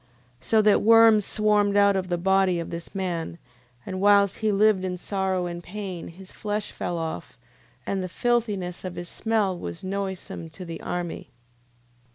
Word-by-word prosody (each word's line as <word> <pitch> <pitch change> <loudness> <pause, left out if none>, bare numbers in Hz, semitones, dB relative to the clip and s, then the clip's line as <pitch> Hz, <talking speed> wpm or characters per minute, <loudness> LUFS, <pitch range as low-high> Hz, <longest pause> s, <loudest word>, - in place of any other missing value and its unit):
So 220 - +2
that 210 -1 +4
worms 225 -1 +6
swarmed 210 -1 +2
out 200 -1 +5
of 185 -1 -1
the 175 -1 -1
body 190 0 +2
of 170 - -5
this 170 +3 -8
man, 170 -3 -3 0.5
and 185 0 -4
whilst 200 -1 +4
he 220 -1 +1
lived 205 -1 +3
in 180 -1 -3
sorrow 190 -1 -1
and 175 0 -6
pain, 190 -3 -6
his 185 +3 -12
flesh 210 0 -3
fell 175 - -4
off, 160 -1 -5 0.5
and 195 -1 -1
the 185 - -4
filthiness 210 -5 -1
of 185 -1 -5
his 175 -1 -7
smell 215 -4 0
was 85 - -7
noisome 190 -3 -4
to 180 +3 -9
the 165 -1 -7
army. 175 -5 -4
190 Hz, 170 wpm, -25 LUFS, 175-205 Hz, 0.5 s, worms